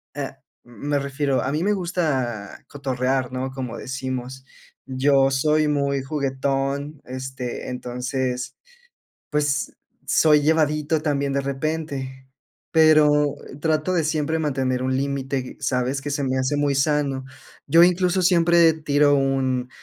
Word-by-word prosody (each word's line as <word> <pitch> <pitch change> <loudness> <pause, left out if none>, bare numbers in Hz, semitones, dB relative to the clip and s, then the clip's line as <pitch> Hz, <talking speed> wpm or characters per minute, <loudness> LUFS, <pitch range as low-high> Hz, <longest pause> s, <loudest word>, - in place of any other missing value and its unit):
ah, - - -5 0.2
me 140 +5 -3
refiero, 140 0 -1
a 135 - -1
mí 155 +3 -1
me 205 - +2
gusta 145 - -2
cotorrear, 130 -2 -1
¿no? 130 +1 -3
Como 130 -3 -5
decimos, 130 0 -5 0.4
yo 135 +1 +2
soy 150 +3 +2
muy 140 -2 0
juguetón, 140 +1 -2
este, 130 -1 -6
entonces, 125 0 -3 0.7
pues, 145 -2 0 0.3
soy 150 -2 +4
llevadito 150 0 +1
también 140 -2 -1
de 140 - +1
repente, 135 -2 -4 0.4
pero, 150 -2 +5
eh, - - -10
trato 160 +3 +1
de 170 - +2
siempre 155 +1 0
mantener 130 -4 -1
un 130 0 0
límite, 135 -1 -3
¿sabes?, 130 0 -1
que 145 - -4
se 145 0 -1
me 130 0 0
hace 130 +3 0
muy 145 -1 +1
sano. 140 -2 0 0.4
Yo 165 +1 +6
incluso 180 +1 +2
siempre 170 -2 +5
tiro 145 -2 +2
un: 130 -2 0
140 Hz, 130 wpm, -23 LUFS, 130-150 Hz, 0.7 s, Yo